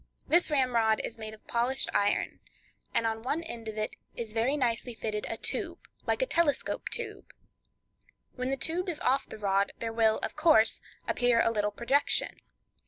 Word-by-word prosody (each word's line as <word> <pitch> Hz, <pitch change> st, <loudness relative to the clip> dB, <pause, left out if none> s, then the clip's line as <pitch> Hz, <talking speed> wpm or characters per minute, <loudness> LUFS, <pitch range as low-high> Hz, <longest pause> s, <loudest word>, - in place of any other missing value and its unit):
This 345 Hz, +1 st, +4 dB
ramrod 240 Hz, -6 st, +3 dB
is 230 Hz, -, -6 dB
made 220 Hz, 0 st, -6 dB
of 215 Hz, -, -25 dB
polished 245 Hz, +3 st, 0 dB
iron, 205 Hz, 0 st, +1 dB, 0.5 s
and 230 Hz, -, +2 dB
on 225 Hz, 0 st, -1 dB
one 290 Hz, +7 st, -1 dB
end 235 Hz, -9 st, -7 dB
of 220 Hz, 0 st, -5 dB
it 215 Hz, 0 st, -2 dB, 0.2 s
is 225 Hz, -2 st, -5 dB
very 240 Hz, +6 st, +1 dB
nicely 240 Hz, -2 st, -1 dB
fitted 215 Hz, -1 st, -3 dB
a -, -, -3 dB
tube, -, -, -2 dB, 0.3 s
like -, -, +2 dB
a -, -, +2 dB
telescope 330 Hz, -, 0 dB
tube. 425 Hz, -4 st, -5 dB, 1.0 s
When 255 Hz, 0 st, -3 dB
the 270 Hz, -, 0 dB
tube 350 Hz, +7 st, 0 dB
is 320 Hz, -4 st, -3 dB
off 265 Hz, +2 st, +2 dB
the -, -, -7 dB
rod, 200 Hz, -1 st, +1 dB
there 225 Hz, -1 st, -3 dB
will, 220 Hz, -1 st, +3 dB
of -, -, -3 dB
course, 305 Hz, -8 st, +4 dB, 0.3 s
appear 245 Hz, -1 st, +3 dB
a 230 Hz, -, +3 dB
little 210 Hz, -2 st, +1 dB
projection. 250 Hz, +7 st, +1 dB
235 Hz, 175 wpm, -30 LUFS, 220-285 Hz, 1.0 s, This